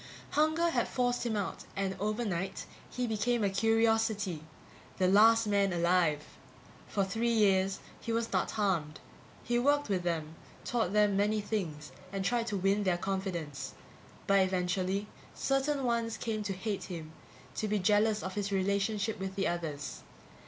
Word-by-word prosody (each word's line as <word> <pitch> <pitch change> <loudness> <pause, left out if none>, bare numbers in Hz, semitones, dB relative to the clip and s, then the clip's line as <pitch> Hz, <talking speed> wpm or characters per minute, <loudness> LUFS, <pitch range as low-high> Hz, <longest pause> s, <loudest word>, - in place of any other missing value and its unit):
Hunger 315 +3 +2
had 240 -5 +1
forced 245 -1 0
him 220 - -1
out 200 - -4
and 195 -1 -1
overnight 200 -3 -2 0.2
he 250 - -2
became 230 +1 0
a 200 - +2
curiosity. 225 -4 +2 0.6
The 185 - +3
last 225 +4 +6
man 200 -2 +2
alive. 170 -3 +2 0.6
For 200 -2 0
three 225 +5 -1
years 195 -3 +3 0.2
he 230 - -4
was 230 0 -1
not - - +1
harmed. 175 -8 -1 0.4
He 240 0 +1
worked 290 +1 +2
with 190 -3 +1
them, 160 -3 -2 0.3
taught 225 -7 0
them 210 -1 +4
many 210 +2 +2
things, 185 -8 -3 0.2
and 195 -1 -3
tried 235 0 +1
to 205 - -1
win 195 +2 +2
their 185 -3 +1
confidence. 175 -7 -4 0.5
But, 195 0 +4
eventually, 185 +1 0 0.3
certain 270 +1 0
ones 235 -2 0
came 220 -2 -2
to 200 - -1
hate 200 +2 -3
him, 165 -4 -7 0.4
to 215 - -2
be 210 0 +1
jealous 210 +2 +2
of 190 - -4
his 205 0 -2
relationship 200 +2 0
with 190 0 -4
the 195 -1 0
others. 160 -4 -4
200 Hz, 155 wpm, -31 LUFS, 185-225 Hz, 0.6 s, last